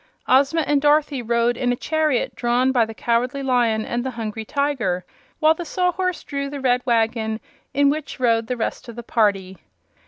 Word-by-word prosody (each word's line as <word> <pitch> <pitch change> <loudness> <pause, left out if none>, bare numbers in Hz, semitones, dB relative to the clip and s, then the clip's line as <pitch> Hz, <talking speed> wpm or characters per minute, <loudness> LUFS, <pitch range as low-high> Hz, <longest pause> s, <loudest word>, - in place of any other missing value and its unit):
Ozma 280 +5 +4
and 290 -2 +1
Dorothy 295 -2 +2
rode 235 +1 +1
in 245 0 0
a - - +1
chariot 310 -1 0
drawn 245 +2 +1
by 245 -3 +3
the 225 - -8
Cowardly 245 +4 0
Lion 240 -4 +1
and 240 0 -2
the 260 - -2
Hungry 225 -2 -5
Tiger, 240 -9 -1 0.3
while 315 0 +4
the 345 - -6
Sawhorse 365 +1 -1
drew 280 -1 -4
the 285 0 -6
red 250 -2 +2
wagon 225 -1 +1 0.3
in 280 0 +3
which 300 -2 -5
rode 230 -2 +2
the 250 - -2
rest 235 +2 -4
of 235 - -9
the 240 - -7
party. 195 -5 0
250 Hz, 185 wpm, -22 LUFS, 230-285 Hz, 0.3 s, Ozma